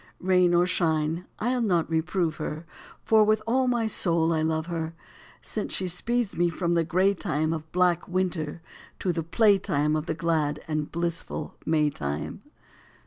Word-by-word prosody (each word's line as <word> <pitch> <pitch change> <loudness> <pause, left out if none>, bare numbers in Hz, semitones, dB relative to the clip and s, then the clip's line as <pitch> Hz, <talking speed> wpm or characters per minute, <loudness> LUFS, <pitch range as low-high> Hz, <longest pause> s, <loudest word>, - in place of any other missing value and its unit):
Rain 180 -1 +3
or 175 +1 +4
shine, 165 -1 0
I 245 +3 0
ll 250 - 0
not 180 -7 +2
reprove 165 0 0
her, 155 +1 -5 0.4
For 220 -1 +5
with 215 0 +3
all 255 +3 +2
my 240 -2 +1
soul 170 -6 +2
I 160 - +1
love 160 0 0
her, 165 -1 -4 0.5
Since - - -3
she 185 - -1
speeds 230 +5 -1
me 175 +1 +2
from 170 +1 -1
the 170 -1 +3
gray 185 +4 +2
time 155 -3 -1
Of 155 -1 -6
black 180 -2 +2
winter 175 -3 -2 0.3
to 180 - -1
the 165 - -1
play 200 +5 +3
time 150 -5 0
Of 155 0 -2
the 160 - -1
glad 155 -2 0
and 155 -1 -2
blissful 170 0 -3
May 155 -2 +2
time. 75 - -4
170 Hz, 175 wpm, -26 LUFS, 160-185 Hz, 0.5 s, For